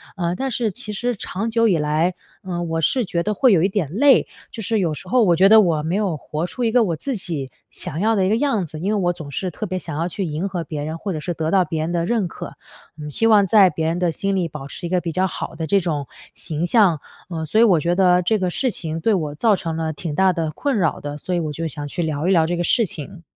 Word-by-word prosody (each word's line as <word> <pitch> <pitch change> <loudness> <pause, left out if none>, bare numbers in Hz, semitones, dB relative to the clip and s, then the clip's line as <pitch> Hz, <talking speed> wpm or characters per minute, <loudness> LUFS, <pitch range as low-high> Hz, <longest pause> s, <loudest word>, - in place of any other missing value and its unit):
呃， 175 -2 -1
但 270 +7 -2
是 235 -3 -1
其 210 +1 -7
实 245 +4 -1
长 200 +2 -4
久 230 0 +3
以 185 -6 +3
来， 155 +4 0 0.3
呃， 180 -4 -4
我 165 -1 -2
是 240 - +2
觉 170 -2 -1
得 210 +4 -1
会 260 +1 +4
有 170 - +4
一 190 - +2
点 190 -8 -2
累。 275 +6 +5 0.2
就 225 - -6
是 220 +2 +1
有 165 -5 0
时 185 - -10
候 250 +4 +3
我 175 -5 +4
觉 190 +4 +5
得 220 +2 +8
我 165 -6 +1
没 165 +4 -1
有 200 -6 0
活 155 +3 -4
出 245 +7 -5
一 230 - +2
个 245 0 +4
我 175 -6 -1
自 265 - -3
己 155 - -4 0.2
想 155 - -6
要 220 +4 +2
的 195 -2 +2
一 - - +1
个 215 - +3
样 230 -8 0
子， 155 -1 -9
因 190 +6 -1
为 215 - +1
我 175 -2 +1
总 160 -4 -9
是 180 +7 -3
特 215 - -5
别 185 0 -3
想 165 -4 -5
要 165 - 0
去 195 +3 -4
迎 165 +4 -3
合 180 -3 -3
别 150 -2 -5
人， 155 +2 -4
或 195 +2 -4
者 155 - -3
是 175 +3 -4
得 160 0 -2
到 190 -2 +4
别 160 -3 -3
人 160 +2 -2
的 170 -1 0
认 225 -5 +1
可， - - -8 0.5
嗯， 150 0 -6
希 225 +10 +2
望 210 -3 +5
在 195 -1 +6
别 160 -2 -3
人 165 +2 0
的 175 -2 +1
心 195 +5 -1
里 180 -3 0
保 150 -3 -8
持 170 +5 -6
一 - - -7
个 180 0 +2
比 170 - -3
较 185 +3 +1
好 - - -5
的 160 0 -4
这 200 +3 +3
种 155 -6 -2 0.3
形 160 0 -3
象。 185 -5 +4 0.3
呃， 160 -2 -4
所 215 +9 +2
以 - - +8
我 190 -8 +5
觉 170 +3 0
得 180 -1 +4
这 215 +5 +1
个 185 -1 0
事 255 +8 0
情， 165 -4 -4
对 220 +7 +2
我 155 -6 -2
造 215 +5 +3
成 165 -3 -4
了 160 -1 -2
挺 155 0 -5
大 190 +1 +3
的 165 -2 -2
困 260 - -1
扰 165 -5 0
的， 145 0 -6
所 180 +4 -3
以 - - +1
我 155 -3 -3
就 165 +3 -3
想 150 -2 -6
去 160 - -4
聊 155 0 -1
一 - - +3
聊 165 -4 +4
这 175 +1 -1
个 175 - 0
事 230 +6 +3
情。 165 +2 -7
175 Hz, 315 characters per minute, -21 LUFS, 160-205 Hz, 0.5 s, 得